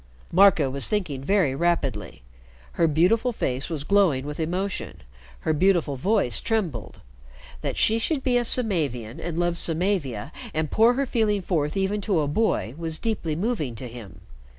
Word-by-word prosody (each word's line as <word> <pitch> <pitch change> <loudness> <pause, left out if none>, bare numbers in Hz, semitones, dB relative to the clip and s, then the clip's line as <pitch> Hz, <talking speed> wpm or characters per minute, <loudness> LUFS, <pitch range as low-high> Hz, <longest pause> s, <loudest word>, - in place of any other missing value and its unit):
Marco 185 -5 +5
was 135 +1 -1
thinking 175 -11 -2
very 180 -4 +2
rapidly. 135 - -1 0.5
Her 165 - +2
beautiful 185 +11 +2
face 135 - -3
was 155 -4 -3
glowing 170 -8 +2
with 150 +1 -6
emotion, 180 - -3 0.4
her 160 - 0
beautiful 170 -3 +2
voice 135 - +1
trembled. 180 - -2 0.6
That - - -3
she 225 +1 +3
should 275 +3 -1
be 250 -2 +1
a 240 - +1
Samavian, 150 - 0
and 170 -2 -5
love 175 0 0
Samavia, 160 - -1 0.2
and 155 -1 -1
pour 230 +2 +5
her 275 +2 0
feeling 215 -5 0
forth 155 -2 -1
even 195 +2 0
to 195 -5 +1
a 145 - -1
boy, 145 - 0
was 165 -1 -2
deeply 190 -8 -2
moving 170 - -2
to 125 +3 -7
him. 115 -4 -11
170 Hz, 160 wpm, -24 LUFS, 140-205 Hz, 0.6 s, Marco